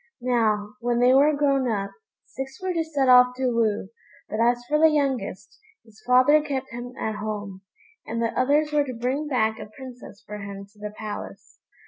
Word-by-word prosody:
Now, 215 Hz, -4 st, 0 dB
when 240 Hz, +1 st, 0 dB
they 250 Hz, +1 st, +5 dB
were 285 Hz, +3 st, +5 dB
grown 275 Hz, -3 st, +2 dB
up, 200 Hz, -3 st, -2 dB, 0.3 s
six 270 Hz, 0 st, -8 dB
were 375 Hz, -1 st, -2 dB
to 330 Hz, -1 st, 0 dB
set 290 Hz, -4 st, -1 dB
off 250 Hz, 0 st, +6 dB
to 255 Hz, -1 st, 0 dB
woo, 215 Hz, -4 st, 0 dB, 0.4 s
but 215 Hz, -, -4 dB
as 240 Hz, +1 st, +2 dB
for 300 Hz, +2 st, +2 dB
the 320 Hz, 0 st, +7 dB
youngest, 270 Hz, -11 st, -2 dB, 0.3 s
his 220 Hz, -2 st, -20 dB
father 255 Hz, +5 st, +5 dB
kept 270 Hz, -3 st, -4 dB
him 240 Hz, +1 st, -7 dB
at 220 Hz, -1 st, -2 dB
home, 205 Hz, -3 st, -5 dB, 0.5 s
and 230 Hz, +1 st, -3 dB
the 230 Hz, -1 st, -1 dB
others 295 Hz, +4 st, +2 dB
were 295 Hz, -1 st, +3 dB
to 260 Hz, -2 st, -6 dB
bring 260 Hz, +6 st, -2 dB
back 220 Hz, -5 st, 0 dB
a -, -, -7 dB
princess 245 Hz, -3 st, -12 dB
for 210 Hz, 0 st, -7 dB
him 200 Hz, 0 st, -7 dB
to 210 Hz, -, -23 dB
the 210 Hz, 0 st, -5 dB
palace. 215 Hz, -1 st, -8 dB
245 Hz, 190 wpm, -24 LUFS, 215-275 Hz, 0.5 s, the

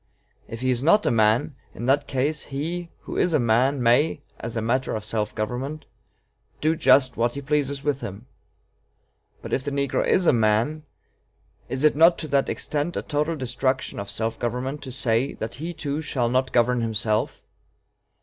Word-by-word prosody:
If 115 Hz, +1 st, -8 dB
he 130 Hz, 0 st, +1 dB
is 120 Hz, -1 st, +1 dB
not 205 Hz, +9 st, +4 dB
a -, -, +3 dB
man, 110 Hz, +4 st, +2 dB, 0.2 s
in 120 Hz, -, -5 dB
that 140 Hz, +2 st, +2 dB
case, 140 Hz, +3 st, -1 dB
he 165 Hz, +5 st, -4 dB
who -, -, -6 dB
is 175 Hz, -, +2 dB
a 155 Hz, -, +4 dB
man 125 Hz, +3 st, +2 dB
may, 120 Hz, +7 st, +3 dB, 0.2 s
as 115 Hz, 0 st, -5 dB
a -, -, +1 dB
matter 130 Hz, +3 st, 0 dB
of 105 Hz, -1 st, -5 dB
self 110 Hz, -1 st, -2 dB
government, 130 Hz, +8 st, -4 dB, 0.7 s
do 155 Hz, +2 st, +2 dB
just 130 Hz, -4 st, +4 dB
what 120 Hz, +2 st, 0 dB
he 140 Hz, -, -4 dB
pleases 140 Hz, -1 st, -1 dB
with 145 Hz, -1 st, -1 dB
him. 100 Hz, +4 st, -7 dB, 1.2 s
But -, -, -6 dB
if 130 Hz, -, 0 dB
the 145 Hz, -, -2 dB
negro 140 Hz, -1 st, 0 dB
is 185 Hz, -, +2 dB
a -, -, +5 dB
man, 115 Hz, +7 st, +1 dB, 0.8 s
is 130 Hz, +2 st, -2 dB
it 150 Hz, -, +5 dB
not 165 Hz, +3 st, +6 dB
to 155 Hz, -, -4 dB
that 140 Hz, 0 st, +2 dB
extent 150 Hz, +4 st, -2 dB
a -, -, -2 dB
total 150 Hz, +2 st, -1 dB
destruction 130 Hz, -2 st, -2 dB
of 100 Hz, 0 st, -5 dB
self 110 Hz, +2 st, -2 dB
government 125 Hz, +5 st, -3 dB
to 130 Hz, -, -6 dB
say 125 Hz, 0 st, +1 dB
that 110 Hz, +1 st, -6 dB
he 170 Hz, +2 st, -3 dB
too 155 Hz, -2 st, -3 dB
shall 130 Hz, -6 st, -1 dB
not 130 Hz, +1 st, +1 dB
govern 125 Hz, 0 st, +2 dB
himself? 110 Hz, -1 st, 0 dB
130 Hz, 185 wpm, -24 LUFS, 115-150 Hz, 1.2 s, not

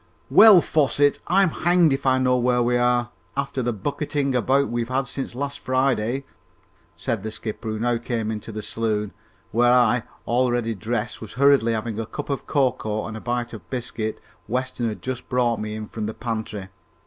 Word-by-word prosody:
"Well, 215 Hz, -5 st, +9 dB
Fosset, 145 Hz, -2 st, +2 dB
I'm 190 Hz, +1 st, +4 dB
hanged 175 Hz, -3 st, +3 dB
if 135 Hz, 0 st, -2 dB
I 130 Hz, 0 st, +4 dB
know 130 Hz, -1 st, +3 dB
where 125 Hz, 0 st, +2 dB
we 120 Hz, +1 st, +1 dB
are, 120 Hz, 0 st, +2 dB, 0.3 s
after 135 Hz, -1 st, -1 dB
the 120 Hz, 0 st, 0 dB
bucketting 140 Hz, +5 st, -2 dB
about 135 Hz, +3 st, +2 dB
we've 120 Hz, 0 st, -2 dB
had 135 Hz, +1 st, 0 dB
since 135 Hz, -1 st, -4 dB
last 140 Hz, +2 st, -3 dB
Friday!" 130 Hz, -1 st, 0 dB, 0.7 s
said 115 Hz, -4 st, -2 dB
the 110 Hz, -, -4 dB
skipper, 110 Hz, +1 st, -5 dB
who 110 Hz, -, -2 dB
now 120 Hz, 0 st, +1 dB
came 115 Hz, -2 st, -2 dB
into 110 Hz, +1 st, -6 dB
the 110 Hz, 0 st, -6 dB
saloon, 105 Hz, -2 st, -2 dB, 0.4 s
where 120 Hz, +2 st, +4 dB
I, 125 Hz, -1 st, +4 dB, 0.2 s
already 120 Hz, -1 st, +1 dB
dressed, 110 Hz, +2 st, -3 dB
was 110 Hz, -, -8 dB
hurriedly 135 Hz, -3 st, +4 dB
having 110 Hz, 0 st, -3 dB
a 110 Hz, -, -3 dB
cup 145 Hz, +5 st, -5 dB
of 140 Hz, -, -3 dB
cocoa 115 Hz, -6 st, 0 dB
and 110 Hz, 0 st, -7 dB
bite 120 Hz, -1 st, -2 dB
of 95 Hz, -7 st, -10 dB
biscuit 115 Hz, -3 st, -4 dB, 0.3 s
Weston 125 Hz, 0 st, -1 dB
had 105 Hz, -, -7 dB
just 130 Hz, -1 st, -5 dB
brought 120 Hz, -3 st, +1 dB
me 105 Hz, 0 st, -4 dB
in 110 Hz, 0 st, -5 dB
from 110 Hz, -2 st, -4 dB
the 110 Hz, -, -5 dB
pantry. 110 Hz, -4 st, -4 dB
120 Hz, 185 wpm, -23 LUFS, 110-130 Hz, 0.7 s, Well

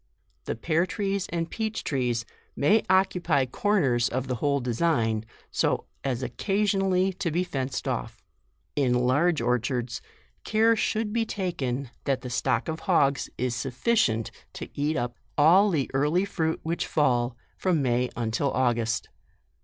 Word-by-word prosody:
The -, -, -2 dB
pear 165 Hz, +8 st, +1 dB
trees 200 Hz, -2 st, -2 dB
and 165 Hz, -1 st, -2 dB
peach 220 Hz, +3 st, -3 dB
trees, 120 Hz, -5 st, -1 dB, 0.3 s
may 210 Hz, +10 st, +4 dB
occupy 180 Hz, -7 st, +3 dB
corners 130 Hz, -, +1 dB
of 130 Hz, +1 st, -2 dB
the 125 Hz, -1 st, -2 dB
whole 140 Hz, -1 st, +2 dB
design, 120 Hz, -4 st, 0 dB, 0.3 s
so -, -, 0 dB, 0.2 s
as 130 Hz, -2 st, -1 dB
occasionally 195 Hz, -, +1 dB
to 185 Hz, -1 st, -2 dB
be 170 Hz, +3 st, 0 dB
JUNE. -, -, -1 dB
J -, -, -21 dB
39 135 Hz, -5 st, -1 dB
fenced 130 Hz, -, -5 dB
off. -, -, -4 dB, 0.5 s
In 130 Hz, -4 st, +2 dB
large 150 Hz, +4 st, +2 dB
orchards, 125 Hz, 0 st, -1 dB, 0.4 s
care 225 Hz, +1 st, +3 dB
should 215 Hz, -1 st, -1 dB
be 230 Hz, 0 st, +2 dB
taken 140 Hz, -, -3 dB
that 135 Hz, -2 st, 0 dB
the 125 Hz, -, -6 dB
stock 115 Hz, -, 0 dB
of 160 Hz, 0 st, -3 dB
hogs 140 Hz, -7 st, +2 dB
is 125 Hz, -1 st, -1 dB
sufficient 125 Hz, -, +1 dB, 0.2 s
to -, -, -7 dB
eat 150 Hz, +2 st, 0 dB
up 120 Hz, -3 st, -3 dB, 0.2 s
all 180 Hz, +8 st, +6 dB
the 150 Hz, -8 st, 0 dB
early 150 Hz, +8 st, +2 dB
fruit 160 Hz, -5 st, -1 dB
which 165 Hz, +2 st, -2 dB
fall, 120 Hz, -5 st, +1 dB, 0.2 s
from 175 Hz, -6 st, +1 dB
May 125 Hz, 0 st, +1 dB
until 120 Hz, +4 st, 0 dB
August. 120 Hz, -3 st, 0 dB
145 Hz, 155 wpm, -27 LUFS, 125-185 Hz, 0.5 s, all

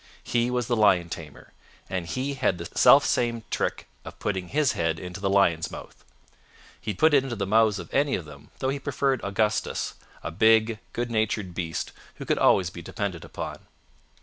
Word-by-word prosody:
He 120 Hz, 0 st, +1 dB
was 125 Hz, -1 st, 0 dB
the 120 Hz, -, 0 dB
lion 95 Hz, -6 st, +4 dB
tamer, 80 Hz, -4 st, -9 dB, 0.3 s
and 90 Hz, -3 st, -3 dB
he 130 Hz, +8 st, -2 dB
had 130 Hz, -9 st, 0 dB
the 85 Hz, -, -6 dB
self -, -, +7 dB
same 115 Hz, -2 st, 0 dB
trick -, -, -2 dB, 0.2 s
of -, -, -10 dB
putting 95 Hz, -3 st, -2 dB
his 145 Hz, 0 st, +2 dB
head 80 Hz, -4 st, -1 dB
into 90 Hz, +2 st, -7 dB
the 95 Hz, 0 st, 0 dB
lion's 90 Hz, -5 st, +3 dB
mouth. -, -, -11 dB, 0.8 s
He'd 105 Hz, -4 st, -4 dB
put 160 Hz, -1 st, +4 dB
it 140 Hz, -2 st, +5 dB
into 130 Hz, -3 st, -4 dB
the 100 Hz, -2 st, -2 dB
mouths 110 Hz, +1 st, +3 dB
of 85 Hz, -3 st, -9 dB
any 140 Hz, 0 st, +2 dB
of 90 Hz, -, -5 dB
them, 75 Hz, -1 st, -13 dB
though 130 Hz, -, -1 dB
he 140 Hz, +1 st, -2 dB
preferred 135 Hz, -1 st, 0 dB
Augustus, 105 Hz, +2 st, -1 dB, 0.3 s
a 85 Hz, -, -4 dB
big, 110 Hz, +4 st, +4 dB
good 120 Hz, 0 st, -2 dB
natured 110 Hz, -4 st, -1 dB
beast 85 Hz, -3 st, -3 dB, 0.2 s
who -, -, -8 dB
could -, -, +1 dB
always 90 Hz, -2 st, +4 dB
be 85 Hz, -, -9 dB
depended 90 Hz, 0 st, -4 dB
upon. -, -, -7 dB
105 Hz, 190 wpm, -26 LUFS, 90-120 Hz, 0.8 s, self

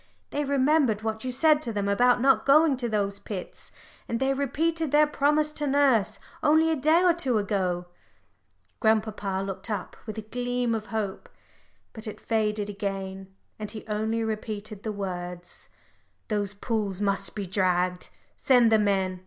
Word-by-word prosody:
They 295 Hz, -, -1 dB
remembered 275 Hz, -5 st, +2 dB
what 220 Hz, 0 st, -3 dB
you 255 Hz, -, -2 dB
said 300 Hz, +4 st, +4 dB
to 235 Hz, -, -4 dB
them 205 Hz, -2 st, -2 dB
about 245 Hz, +5 st, +3 dB
not 270 Hz, +1 st, +4 dB
going 295 Hz, +1 st, +5 dB
to 240 Hz, -2 st, -2 dB
those 200 Hz, -2 st, -1 dB
pits, 190 Hz, -4 st, -7 dB, 0.4 s
and 230 Hz, -, -1 dB
they 265 Hz, 0 st, +2 dB
repeated 320 Hz, +4 st, -1 dB
their 300 Hz, +1 st, +6 dB
promise 300 Hz, +1 st, +1 dB
to 295 Hz, -1 st, -3 dB
nurse 270 Hz, -7 st, +2 dB, 0.2 s
only 315 Hz, +2 st, +4 dB
a -, -, +2 dB
day 310 Hz, +5 st, +3 dB
or 355 Hz, -2 st, +5 dB
two 270 Hz, -9 st, 0 dB
ago." 185 Hz, -4 st, -1 dB, 0.9 s
Grandpapa 215 Hz, -3 st, 0 dB
looked 195 Hz, +4 st, -6 dB
up 205 Hz, -4 st, -4 dB
with 215 Hz, -, -6 dB
a 220 Hz, -, -4 dB
gleam 245 Hz, +1 st, -2 dB
of 215 Hz, -1 st, -3 dB
hope. 210 Hz, -3 st, -4 dB, 0.6 s
But 220 Hz, 0 st, -9 dB
it 215 Hz, -, -7 dB
faded 210 Hz, -2 st, -1 dB
again, 195 Hz, -1 st, -5 dB, 0.2 s
and 210 Hz, -1 st, -5 dB
he 215 Hz, 0 st, -8 dB
only 220 Hz, +1 st, -1 dB
repeated 215 Hz, -1 st, -5 dB
the 215 Hz, -, -3 dB
words 180 Hz, -3 st, -6 dB, 0.6 s
"Those 205 Hz, -2 st, -1 dB
pools 205 Hz, -3 st, -2 dB
must 200 Hz, -1 st, 0 dB
be 205 Hz, -2 st, -3 dB
dragged. 180 Hz, -1 st, 0 dB, 0.3 s
Send 245 Hz, -4 st, +4 dB
the 220 Hz, -, +5 dB
men. 190 Hz, -3 st, 0 dB
220 Hz, 160 wpm, -26 LUFS, 200-265 Hz, 0.9 s, their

